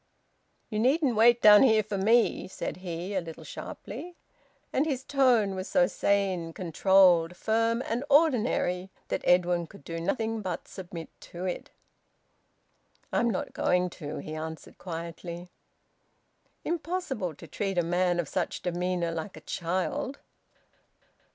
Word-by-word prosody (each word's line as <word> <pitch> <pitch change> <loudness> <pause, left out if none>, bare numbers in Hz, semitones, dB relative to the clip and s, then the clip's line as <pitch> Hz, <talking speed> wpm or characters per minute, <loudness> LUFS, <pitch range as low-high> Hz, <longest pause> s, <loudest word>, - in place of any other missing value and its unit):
"You 210 - -1
needn't 265 +1 +2
wait 235 +2 +5
down 210 -1 +9
here 220 -5 +5
for 205 0 -4
me," 225 +5 +3
said 185 - -5
he, 180 +1 -5
a 190 - 0
little 165 -1 -9
sharply. 290 - -8 0.6
And 290 +4 +2
his 265 -4 -2
tone 250 -9 +3
was 185 0 -4
so 270 -1 +4
sane, 190 -8 0
controlled, 180 0 +4
firm, 230 +2 +1
and 235 +3 -2
ordinary 245 - +2 0.2
that - - -1
Edwin 175 -1 +3
could 150 - -15
do 165 +2 -5
nothing 220 +5 -1
but 185 -4 -4
submit 175 -3 -8 0.2
to 175 +2 -6
it. 180 - -4 1.4
"I'm 235 - +2
not 200 - -3
going 180 0 +1
to," 150 -3 -7
he 155 - -6
answered 160 0 -7
quietly. 170 0 -7 1.2
Impossible 325 - -2
to - - -12
treat 195 -3 -3
a 175 - +3
man 175 +1 +1
of 170 - -1
such 180 +2 -3
demeanour 180 -1 -1
like 165 +4 -5
a - - -10
child. 190 - -2
190 Hz, 140 wpm, -28 LUFS, 175-230 Hz, 1.4 s, down